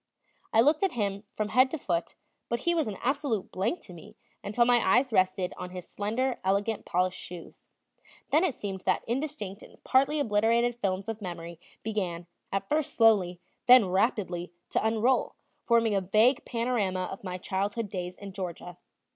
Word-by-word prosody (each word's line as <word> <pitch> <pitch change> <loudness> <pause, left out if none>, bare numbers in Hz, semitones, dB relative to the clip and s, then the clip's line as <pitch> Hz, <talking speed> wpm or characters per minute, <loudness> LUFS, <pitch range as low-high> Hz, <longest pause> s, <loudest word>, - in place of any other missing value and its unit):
I 225 - +5
looked 295 +5 +3
at 390 -2 +1
him 200 -3 -2
from 215 -1 -3
head 255 +4 +5
to 320 - -3
foot, 170 - -2 0.3
but 235 0 -1
he 345 - +2
was 320 -6 +1
an 200 -3 -4
absolute 270 -6 -1
blank 215 - -1
to 180 - -12
me 165 - -13 0.3
until 235 +4 +2
my 245 0 +5 0.2
eyes 255 -1 +1
rested 185 -1 +2
on 180 - -6
his 180 -1 -8
slender, 235 +5 -2
elegant 200 +3 0
polished 180 +1 0
shoes; 175 -2 -9 0.7
then 310 +5 +4
it 330 -9 +1
seemed 195 -2 -5
that - - 0
indistinct 235 -6 -4
and - - -16
partly 275 +3 +3
obliterated 230 0 +2
films 195 +1 -1
of 225 -1 -4
memory 170 -3 -7 0.2
began, 185 -6 -3 0.3
at 195 0 -2
first 305 +2 -1
slowly, 200 -6 +4 0.3
then 245 -6 +8
rapidly, 185 -3 0 0.2
to - - +1
unroll, 225 +4 +1 0.3
forming 230 -2 +3
a 195 - +2
vague 215 +8 +3
panorama 230 -6 -1
of 195 - -8
my 180 -1 -4
childhood 200 +4 -2
days 180 -1 -5
in 200 -1 -9
Georgia. 180 -2 -6
210 Hz, 170 wpm, -28 LUFS, 185-245 Hz, 0.7 s, then